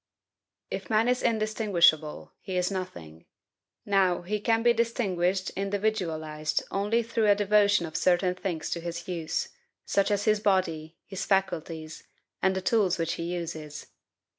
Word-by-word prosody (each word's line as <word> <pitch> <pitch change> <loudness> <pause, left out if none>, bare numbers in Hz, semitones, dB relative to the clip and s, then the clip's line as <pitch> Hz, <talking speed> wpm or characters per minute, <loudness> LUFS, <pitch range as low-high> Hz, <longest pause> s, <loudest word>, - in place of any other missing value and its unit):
If - - -5
man 220 +1 +3
is 250 0 +1
indistinguishable, 205 -8 +2
he 185 -1 -4
is 180 +1 +1
nothing. 85 - -7 0.6
Now, 190 -3 +2
he 210 +4 -2
can 225 +2 +1
be 240 0 +5
distinguished, 195 -6 0
individualized, 180 -7 -2
only 210 +4 +1
through 225 -2 +1
a 205 - +6
devotion 205 -2 +3
of 160 - -9
certain 180 0 +2
things 180 -3 -4
to 170 - -1
his 170 0 -6
use, 165 -3 -2 0.4
such 200 0 +1
as 205 -1 0
his 215 -1 +3
body, 170 -6 0
his 195 -1 -5
faculties, 165 -5 -1 0.4
and 190 0 +2
the 190 - -1
tools 200 -3 +2
which 165 -1 -1
he 170 - -4
uses. 160 -4 -6
190 Hz, 145 wpm, -28 LUFS, 165-210 Hz, 0.6 s, a